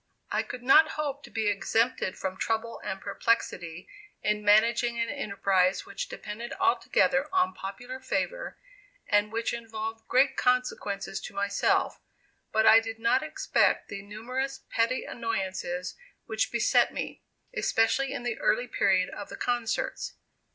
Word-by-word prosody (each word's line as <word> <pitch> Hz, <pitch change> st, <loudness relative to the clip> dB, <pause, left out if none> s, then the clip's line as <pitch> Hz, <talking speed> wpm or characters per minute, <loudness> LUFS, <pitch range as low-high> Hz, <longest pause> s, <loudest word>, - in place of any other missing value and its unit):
I -, -, +2 dB
could 250 Hz, -, -8 dB
not 310 Hz, +5 st, +6 dB
hope 285 Hz, -2 st, -2 dB
to -, -, -12 dB
be 220 Hz, -2 st, -1 dB
exempted 205 Hz, +1 st, +1 dB
from 190 Hz, -1 st, -3 dB
trouble 225 Hz, +3 st, -2 dB
and 190 Hz, 0 st, -4 dB
perplexity 180 Hz, -5 st, -1 dB, 0.4 s
in 210 Hz, 0 st, 0 dB
managing 235 Hz, +3 st, +4 dB
an 230 Hz, -, 0 dB
enterprise 195 Hz, -7 st, +1 dB
which -, -, -5 dB
depended 225 Hz, +3 st, -6 dB
altogether 375 Hz, -, +2 dB
on 370 Hz, -1 st, +2 dB
popular 245 Hz, +7 st, -7 dB
favor, -, -, -3 dB, 0.5 s
and 205 Hz, +1 st, +2 dB
which 230 Hz, +1 st, -1 dB
involved 225 Hz, -1 st, -5 dB
great 270 Hz, +2 st, +3 dB
consequences 250 Hz, -6 st, 0 dB
to -, -, -9 dB
myself; 200 Hz, 0 st, +1 dB, 0.5 s
but 220 Hz, 0 st, +3 dB
I 225 Hz, -, +9 dB
did 225 Hz, 0 st, -6 dB
not 230 Hz, +3 st, +2 dB
expect -, -, +1 dB
the 200 Hz, -1 st, -5 dB
numerous 250 Hz, +7 st, -4 dB
petty 230 Hz, +3 st, +1 dB
annoyances 190 Hz, -6 st, -3 dB, 0.3 s
which 220 Hz, -1 st, -1 dB
beset 235 Hz, -1 st, +3 dB
me, -, -, -5 dB, 0.3 s
especially 270 Hz, -, +2 dB
in -, -, -4 dB
the 240 Hz, -2 st, -2 dB
early 245 Hz, -, +2 dB
period 190 Hz, -5 st, +2 dB
of 205 Hz, -, -7 dB
the -, -, -8 dB
concerts. 240 Hz, -2 st, -2 dB
225 Hz, 140 wpm, -28 LUFS, 205-250 Hz, 0.5 s, I